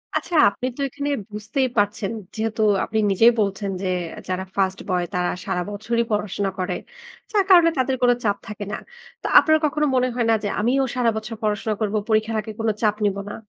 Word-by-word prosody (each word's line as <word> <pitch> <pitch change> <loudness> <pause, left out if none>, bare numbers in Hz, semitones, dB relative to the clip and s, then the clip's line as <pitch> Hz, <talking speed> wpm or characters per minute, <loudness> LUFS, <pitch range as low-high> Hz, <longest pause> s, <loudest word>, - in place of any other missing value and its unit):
আচ্ছা, 345 - -2
আপনি 245 +5 -6
তো - - -4
এখানে 285 +2 -4 0.2
বুঝতেই 220 +6 -1
পারছেন 205 0 +1 0.2
যেহেতু 220 0 -2 0.2
আপনি 220 - -3
নিজেই 225 +5 +6
বলছেন 200 -1 -1
যে, 190 - -2 0.4
যারা 185 0 -1
ফার্স্ট 190 -1 0
বয় 180 -1 +1
তারা 180 0 0 0.2
সারা 180 - -1
বছরই 230 +3 -1
পড়াশোনা 205 -1 -1
করে। 185 - -1 0.6
যার 410 -3 +3
কারণে 345 -3 +7
তাদের 260 0 +1
কোন 245 0 +5
চাপ 205 -2 +1
থাকে 210 -1 -6
না। - - -2 0.4
তো - - -3
আপনার 315 0 +4
কখনো 300 +1 +1
মনে 255 0 +3
হয় 240 -2 +1
না - - +5
যে, - - 0
আমিও 255 +5 +2
সারা 240 -2 +2
বছর 220 +1 -5
পড়াশোনা 215 +1 0
করবো, 215 0 0
পরীক্ষার 220 +1 +1
আগে 220 - -8
কোন 225 - +1
চাপ 210 -1 +2
নিব 200 -1 +1
না? - - -6
215 Hz, 195 wpm, -22 LUFS, 205-245 Hz, 0.6 s, কারণে